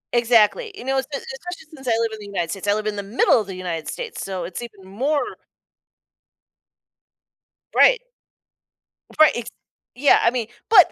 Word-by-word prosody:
Exactly, 240 Hz, -, +3 dB
you 330 Hz, -, -9 dB
know, 270 Hz, 0 st, 0 dB
espe 265 Hz, -, -3 dB
especially 310 Hz, +5 st, -7 dB
since 265 Hz, -3 st, -11 dB
I -, -, +2 dB
live 230 Hz, -1 st, 0 dB
in 220 Hz, -, -7 dB
the 210 Hz, -, -9 dB
United 175 Hz, -5 st, -2 dB
States, 200 Hz, 0 st, -6 dB
I 205 Hz, -, +3 dB
live 215 Hz, 0 st, -3 dB
in 210 Hz, -1 st, -2 dB
the 200 Hz, -, -2 dB
middle 215 Hz, +2 st, +3 dB
of 205 Hz, -, -8 dB
the 190 Hz, -, -6 dB
United 175 Hz, -3 st, -4 dB
States, 480 Hz, -2 st, -5 dB
so 190 Hz, -2 st, -4 dB
it's 175 Hz, +6 st, -6 dB
even 210 Hz, -5 st, -10 dB
more 275 Hz, +9 st, -1 dB, 2.4 s
Right. -, -, +5 dB, 1.2 s
Right. 310 Hz, -1 st, +8 dB
It's 240 Hz, 0 st, -4 dB, 0.5 s
Yeah, 280 Hz, +3 st, +5 dB
I 230 Hz, -, +4 dB
mean 240 Hz, -3 st, -2 dB, 0.2 s
but, 395 Hz, -7 st, +7 dB
230 Hz, 175 wpm, -22 LUFS, 200-280 Hz, 2.4 s, Right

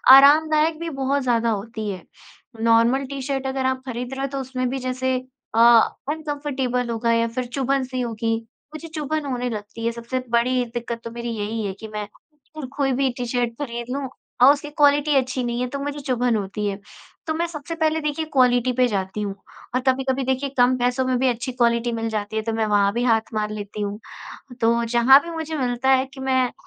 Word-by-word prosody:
आरामदायक 310 Hz, +3 st, +5 dB
भी 335 Hz, 0 st, -3 dB
बहुत 275 Hz, -1 st, -1 dB
ज़्यादा 235 Hz, -2 st, +2 dB
होती 220 Hz, 0 st, -3 dB
है। 185 Hz, -4 st, -6 dB, 0.6 s
नॉर्मल 230 Hz, +4 st, +4 dB
टी-शर्ट 270 Hz, 0 st, -3 dB
अगर 265 Hz, 0 st, -2 dB
आप 260 Hz, 0 st, 0 dB
खरीद 250 Hz, 0 st, -5 dB
रहे 270 Hz, -, -4 dB
हो, 275 Hz, -, 0 dB
तो 275 Hz, 0 st, -4 dB
उसमें 255 Hz, -1 st, -2 dB
भी 265 Hz, +1 st, -3 dB
जैसे 255 Hz, 0 st, -1 dB, 0.4 s
अ, -, -, +3 dB, 0.5 s
अनकम्फर्टेबल 285 Hz, -5 st, -2 dB
होगा 230 Hz, 0 st, 0 dB
या 230 Hz, 0 st, +2 dB
फिर 245 Hz, +2 st, -3 dB
चुभन-सी 260 Hz, 0 st, -1 dB
होगी। 225 Hz, -1 st, -1 dB, 0.4 s
मुझे 320 Hz, +2 st, -7 dB
चुभन 310 Hz, -1 st, -3 dB
होने 250 Hz, -2 st, -2 dB
लगती 215 Hz, +1 st, -6 dB
है। 230 Hz, -, +2 dB
सबसे 235 Hz, +2 st, -4 dB
बड़ी 245 Hz, +2 st, +2 dB
दिक्कत 235 Hz, -1 st, -4 dB
तो 230 Hz, -, -6 dB
मेरी 235 Hz, 0 st, -5 dB
यही 215 Hz, +1 st, -3 dB
है 195 Hz, -, -3 dB
कि 220 Hz, -, -7 dB
मैं 210 Hz, -1 st, -4 dB, 0.5 s
अगर 305 Hz, -, -4 dB
कोई 275 Hz, -2 st, +2 dB
भी 265 Hz, +1 st, +1 dB
टी-शर्ट 245 Hz, -1 st, -1 dB
खरीद 235 Hz, -4 st, -4 dB
लूँ, 280 Hz, -1 st, -3 dB, 0.3 s
और 260 Hz, +3 st, +9 dB
उसकी 295 Hz, 0 st, -6 dB
क्वालिटी 290 Hz, 0 st, +3 dB
अच्छी 260 Hz, -1 st, +1 dB
नहीं 240 Hz, 0 st, -2 dB
है, 250 Hz, -, 0 dB
तो 280 Hz, +3 st, -5 dB
मुझे 290 Hz, +1 st, -4 dB
चुभन 250 Hz, -3 st, 0 dB
होती 210 Hz, 0 st, -3 dB
है। 200 Hz, 0 st, -3 dB, 0.5 s
तो 315 Hz, -, 0 dB
मैं 335 Hz, +2 st, 0 dB
सबसे 330 Hz, 0 st, -6 dB
पहले, 320 Hz, -1 st, +1 dB
देखिए, 300 Hz, +1 st, -2 dB
क्वालिटी 250 Hz, -2 st, +4 dB
पे 250 Hz, 0 st, +3 dB
जाती 195 Hz, -1 st, -2 dB
हूँ। 200 Hz, -1 st, -3 dB, 0.4 s
और 255 Hz, -, +2 dB
कभी-कभी, 265 Hz, 0 st, +1 dB
देखिए, 265 Hz, +2 st, -1 dB
कम 245 Hz, +1 st, +5 dB
पैसों 250 Hz, +1 st, +1 dB
में 255 Hz, -1 st, +1 dB
भी 265 Hz, -, +2 dB
अच्छी 245 Hz, +2 st, -2 dB
क्वालिटी 235 Hz, -1 st, +1 dB
मिल 225 Hz, -1 st, -2 dB
जाती 215 Hz, -1 st, -3 dB
है, 220 Hz, -, +1 dB
तो 225 Hz, 0 st, -2 dB
मैं 220 Hz, 0 st, 0 dB
वहाँ 205 Hz, -1 st, +3 dB
भी 240 Hz, +2 st, -1 dB
हाथ 225 Hz, -2 st, +1 dB
मार 210 Hz, -1 st, -1 dB
लेती 210 Hz, 0 st, -6 dB
हूँ। 205 Hz, 0 st, -3 dB, 0.6 s
तो 235 Hz, +1 st, +3 dB
जहाँ 240 Hz, +4 st, +6 dB
भी 340 Hz, -, -7 dB
मुझे 320 Hz, -1 st, -4 dB
मिलता 250 Hz, -1 st, 0 dB
है 260 Hz, 0 st, +4 dB
कि -, -, -11 dB
मैं 260 Hz, -2 st, +1 dB
250 Hz, 205 wpm, -23 LUFS, 230-275 Hz, 0.6 s, और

